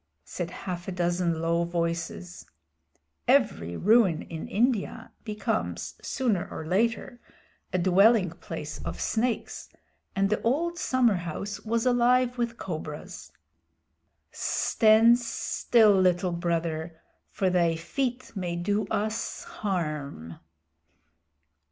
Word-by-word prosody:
said 175 Hz, -2 st, -4 dB
half 175 Hz, -1 st, -6 dB
a -, -, -2 dB
dozen 175 Hz, -2 st, 0 dB
low 170 Hz, +1 st, +2 dB
voices 165 Hz, -, -3 dB, 0.8 s
(every 85 Hz, +1 st, +2 dB
ruin 205 Hz, -6 st, +4 dB
in 160 Hz, -1 st, -7 dB
India 225 Hz, 0 st, 0 dB
becomes 215 Hz, +1 st, -3 dB
sooner 230 Hz, -9 st, -1 dB
or 160 Hz, -, -6 dB
later 230 Hz, +7 st, 0 dB, 0.5 s
a -, -, +1 dB
dwelling 190 Hz, +2 st, +4 dB
place 160 Hz, -3 st, -7 dB
of -, -, -5 dB
snakes, 230 Hz, +1 st, -2 dB, 0.5 s
and 195 Hz, 0 st, +1 dB
the 215 Hz, -, +1 dB
old 335 Hz, +8 st, 0 dB
summerhouse 205 Hz, -, 0 dB
was 230 Hz, +2 st, -1 dB
alive 250 Hz, 0 st, +3 dB
with 235 Hz, -1 st, -1 dB
cobras). 155 Hz, -4 st, -7 dB, 1.0 s
"Stand 225 Hz, +2 st, +4 dB
still, 235 Hz, -2 st, +2 dB
Little 180 Hz, 0 st, +2 dB
Brother, 170 Hz, -1 st, -2 dB, 0.3 s
for 190 Hz, -2 st, 0 dB
thy 170 Hz, -2 st, +2 dB
feet 250 Hz, +9 st, -3 dB
may 180 Hz, -3 st, -3 dB
do 205 Hz, +4 st, -1 dB
us 215 Hz, +2 st, -2 dB
harm." 150 Hz, -, -4 dB
185 Hz, 105 wpm, -27 LUFS, 170-230 Hz, 1.0 s, ruin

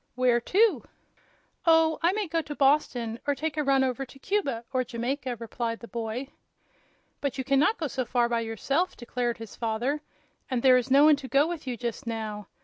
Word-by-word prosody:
"Where 245 Hz, -1 st, +3 dB
to?" 375 Hz, -, +3 dB, 0.8 s
"Oh, 325 Hz, -1 st, +5 dB
I 340 Hz, +2 st, +4 dB
may 420 Hz, -2 st, -1 dB
go 330 Hz, 0 st, 0 dB
to 295 Hz, -1 st, -7 dB
Boston, 255 Hz, -5 st, +1 dB
or 285 Hz, -, +2 dB
take 310 Hz, +2 st, -3 dB
a 305 Hz, -, 0 dB
run 270 Hz, -1 st, +3 dB
over 260 Hz, +1 st, -1 dB
to 270 Hz, +1 st, -12 dB
Cuba 275 Hz, -, -1 dB
or 255 Hz, -1 st, +2 dB
Jamaica," 250 Hz, +2 st, -3 dB
replied 230 Hz, 0 st, -4 dB
the 235 Hz, -, -10 dB
boy. 235 Hz, +4 st, -4 dB, 0.9 s
"But 280 Hz, -2 st, -2 dB
you 265 Hz, -, -2 dB
can 275 Hz, 0 st, +2 dB
not 365 Hz, +10 st, +3 dB
go 325 Hz, -, -3 dB
so 260 Hz, -2 st, -2 dB
far 240 Hz, 0 st, +1 dB
by 235 Hz, -1 st, 0 dB
yourself," 230 Hz, -, -1 dB
declared 240 Hz, -1 st, -2 dB
his 225 Hz, -2 st, -9 dB
father; 240 Hz, +6 st, -1 dB, 0.5 s
"and 255 Hz, -3 st, -1 dB
there 255 Hz, -1 st, +7 dB
is 250 Hz, 0 st, -1 dB
no 275 Hz, +2 st, +6 dB
one 305 Hz, -1 st, +6 dB
to 275 Hz, -2 st, -8 dB
go 275 Hz, +2 st, +4 dB
with 330 Hz, -4 st, -5 dB
you, 245 Hz, -2 st, -3 dB
just 235 Hz, -1 st, -5 dB
now. 215 Hz, -3 st, -4 dB
260 Hz, 205 wpm, -27 LUFS, 235-295 Hz, 0.9 s, there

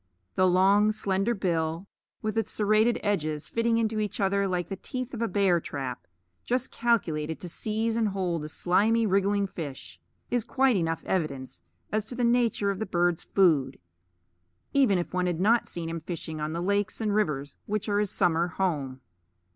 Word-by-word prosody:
The 185 Hz, -, +3 dB
long 195 Hz, +4 st, +4 dB
slender 205 Hz, +1 st, 0 dB
bill, 165 Hz, -2 st, -1 dB, 0.4 s
with 215 Hz, 0 st, -2 dB
its 225 Hz, -, 0 dB
serrated 215 Hz, +3 st, +2 dB
edges 155 Hz, -7 st, -1 dB
fitting 230 Hz, 0 st, +1 dB
into 220 Hz, -1 st, 0 dB
each 210 Hz, -1 st, -2 dB
other 200 Hz, 0 st, +2 dB
like 180 Hz, -2 st, -1 dB
the 195 Hz, -, -3 dB
teeth 255 Hz, +6 st, -6 dB
of 235 Hz, -, -4 dB
a 230 Hz, -, +1 dB
bear 190 Hz, -3 st, +3 dB
trap, 135 Hz, -5 st, -5 dB, 0.4 s
just 250 Hz, +1 st, -1 dB
calculated 160 Hz, -10 st, 0 dB
to 180 Hz, -, -7 dB
seize 220 Hz, +5 st, -2 dB
and 225 Hz, -1 st, +2 dB
hold 180 Hz, -5 st, -2 dB
a 150 Hz, -, -6 dB
slimy 215 Hz, +8 st, +2 dB
wriggling 200 Hz, 0 st, +2 dB
fish, 145 Hz, -, -7 dB, 0.3 s
is 245 Hz, -2 st, +1 dB
quite 265 Hz, +1 st, +2 dB
enough 165 Hz, -3 st, -1 dB
evidence 140 Hz, -, -2 dB, 0.3 s
as 215 Hz, -1 st, 0 dB
to 245 Hz, -, -7 dB
the 245 Hz, -, -1 dB
nature 235 Hz, -4 st, +2 dB
of 195 Hz, -, -5 dB
the 220 Hz, -, -3 dB
bird's 175 Hz, -2 st, +1 dB
food, 150 Hz, -9 st, +2 dB, 1.0 s
even 260 Hz, -9 st, +4 dB
if 175 Hz, -, -3 dB
one 180 Hz, 0 st, +1 dB
had 175 Hz, -2 st, -1 dB
not 225 Hz, +5 st, +3 dB
seen 170 Hz, -1 st, -5 dB
him 165 Hz, 0 st, -3 dB
fishing 160 Hz, -2 st, -5 dB
on 150 Hz, +1 st, -2 dB
the 170 Hz, +2 st, -3 dB
lakes 200 Hz, +1 st, 0 dB
and 215 Hz, -2 st, 0 dB
rivers 150 Hz, -9 st, -1 dB
which 210 Hz, 0 st, -2 dB
are 205 Hz, -1 st, +1 dB
his 210 Hz, -1 st, +1 dB
summer 170 Hz, -1 st, +2 dB
home. 150 Hz, -8 st, -2 dB
195 Hz, 180 wpm, -27 LUFS, 165-215 Hz, 1.0 s, long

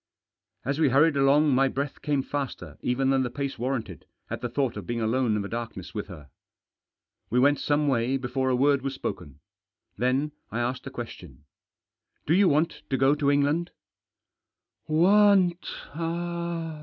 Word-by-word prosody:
As 140 Hz, +4 st, -1 dB
we 155 Hz, -, +4 dB
hurried 145 Hz, +4 st, +4 dB
along 140 Hz, +1 st, +4 dB
my 135 Hz, +1 st, +4 dB
breath 140 Hz, +2 st, -4 dB
came 145 Hz, -3 st, 0 dB
faster 140 Hz, -1 st, -5 dB
even 130 Hz, +2 st, +1 dB
than 135 Hz, -1 st, +3 dB
the 125 Hz, -, -1 dB
pace 140 Hz, 0 st, -4 dB
warranted 120 Hz, -7 st, -3 dB, 0.3 s
at -, -, -4 dB
the 120 Hz, -, -3 dB
thought 130 Hz, 0 st, -1 dB
of 105 Hz, -4 st, -7 dB
being 120 Hz, 0 st, -2 dB
alone 115 Hz, 0 st, +1 dB
in 105 Hz, -, -1 dB
the -, -, -4 dB
darkness 115 Hz, -5 st, -6 dB
with 105 Hz, -, -4 dB
her. 75 Hz, -8 st, -12 dB, 1.0 s
We 120 Hz, -, 0 dB
went 145 Hz, +2 st, +4 dB
some 145 Hz, 0 st, +1 dB
way 130 Hz, 0 st, +1 dB
before 130 Hz, +1 st, -1 dB
a 130 Hz, -, +2 dB
word 140 Hz, +2 st, +3 dB
was 135 Hz, 0 st, -3 dB
spoken. 85 Hz, -, -6 dB, 0.6 s
Then 130 Hz, +5 st, +1 dB, 0.2 s
I 115 Hz, -, -3 dB
asked 125 Hz, +2 st, -2 dB
a -, -, -3 dB
question. 65 Hz, +2 st, -9 dB, 0.4 s
" -, -, -51 dB
Do 155 Hz, -, +2 dB
you 190 Hz, +1 st, +5 dB
want 155 Hz, +3 st, +1 dB
to 135 Hz, -, +1 dB
go 135 Hz, +2 st, +4 dB
to 145 Hz, -1 st, +1 dB
England? 145 Hz, +5 st, +2 dB, 0.5 s
" -, -, -63 dB, 0.2 s
" -, -, -59 dB
Want 185 Hz, +1 st, +4 dB
135 Hz, 175 wpm, -26 LUFS, 120-145 Hz, 1.0 s, you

